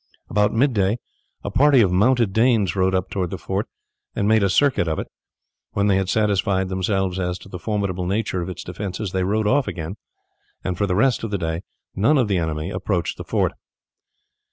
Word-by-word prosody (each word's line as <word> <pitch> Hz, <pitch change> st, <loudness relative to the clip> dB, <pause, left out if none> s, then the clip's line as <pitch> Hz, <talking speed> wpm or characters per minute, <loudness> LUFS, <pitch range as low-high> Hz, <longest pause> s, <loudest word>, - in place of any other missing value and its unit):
About 105 Hz, +2 st, +3 dB
mid 130 Hz, +4 st, +2 dB
day 100 Hz, +1 st, +1 dB, 0.5 s
a -, -, -4 dB
party 140 Hz, -1 st, +5 dB
of 95 Hz, -5 st, +3 dB
mounted 115 Hz, +2 st, +3 dB
Danes 110 Hz, -6 st, +3 dB
rode 95 Hz, 0 st, +2 dB
up 95 Hz, 0 st, -1 dB
towards 95 Hz, -3 st, -1 dB
the -, -, -4 dB
fort -, -, -3 dB, 0.5 s
and 100 Hz, -, 0 dB
made 110 Hz, 0 st, +4 dB
a 100 Hz, -, +2 dB
circuit 135 Hz, -5 st, +2 dB
of 80 Hz, -, -1 dB
it. -, -, -3 dB, 0.7 s
When 100 Hz, -, +1 dB
they 100 Hz, -2 st, +3 dB
had 95 Hz, -1 st, -1 dB
satisfied 100 Hz, -3 st, +1 dB
themselves 95 Hz, 0 st, -1 dB
as 90 Hz, -1 st, -1 dB
to 95 Hz, -, -14 dB
the 90 Hz, -, -7 dB
formidable 95 Hz, -2 st, -2 dB
nature 95 Hz, -2 st, -1 dB
of 85 Hz, -, -4 dB
its 90 Hz, -, -6 dB
defences 95 Hz, +2 st, -5 dB
they 95 Hz, 0 st, 0 dB
rode 105 Hz, +3 st, 0 dB
off 135 Hz, +5 st, +2 dB
again, 85 Hz, +4 st, -5 dB, 0.7 s
and 95 Hz, -, -2 dB
for 100 Hz, +3 st, 0 dB
the 90 Hz, -, 0 dB
rest 120 Hz, +4 st, +2 dB
of 115 Hz, -, -2 dB
the 100 Hz, -, -1 dB
day 80 Hz, -1 st, -2 dB, 0.3 s
none 115 Hz, +10 st, +3 dB
of 125 Hz, -4 st, +2 dB
the 95 Hz, -3 st, +1 dB
enemy 80 Hz, +2 st, -2 dB
approached 90 Hz, -5 st, -2 dB
the -, -, -6 dB
fort. -, -, 0 dB
95 Hz, 205 wpm, -22 LUFS, 90-110 Hz, 0.7 s, party